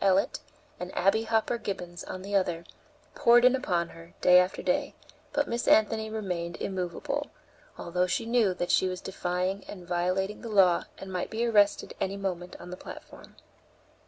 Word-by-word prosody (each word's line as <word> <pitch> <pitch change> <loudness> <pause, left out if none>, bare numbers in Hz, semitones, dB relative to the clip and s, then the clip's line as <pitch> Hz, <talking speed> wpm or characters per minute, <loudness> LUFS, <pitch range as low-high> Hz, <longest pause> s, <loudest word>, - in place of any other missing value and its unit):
Ellet, 195 0 +2 0.4
and 180 +1 -5
Abby 205 +4 +3
Hopper 225 +1 +1
Gibbons, 180 -5 -5
on 185 - -7
the 200 +1 -3
other, 175 -3 0 0.5
poured 240 +1 +5
in 255 +1 +6
upon 175 -9 -1
her, 165 +1 -14
day 180 0 +7
after 180 +1 0
day; - - 0 0.4
but 290 -1 0
Miss 235 +1 -2
Anthony 220 0 +4
remained 180 -6 -3
immovable, 200 - -3 0.5
although 180 +1 0
she 225 +6 -1
knew 230 -5 +2
that 175 - -1
she 185 - +4
was 185 -1 -3
defying 185 +1 -2
and 180 -4 -9
violating 185 +3 -1
the 235 - -6
law 190 -5 +4
and 190 -1 -8
might 180 - -2
be 230 +2 -1
arrested 205 -3 +3
any 195 +1 -1
moment 180 -3 -4
on 175 +1 -10
the 180 - -6
platform. - - -11
190 Hz, 170 wpm, -28 LUFS, 180-220 Hz, 0.5 s, day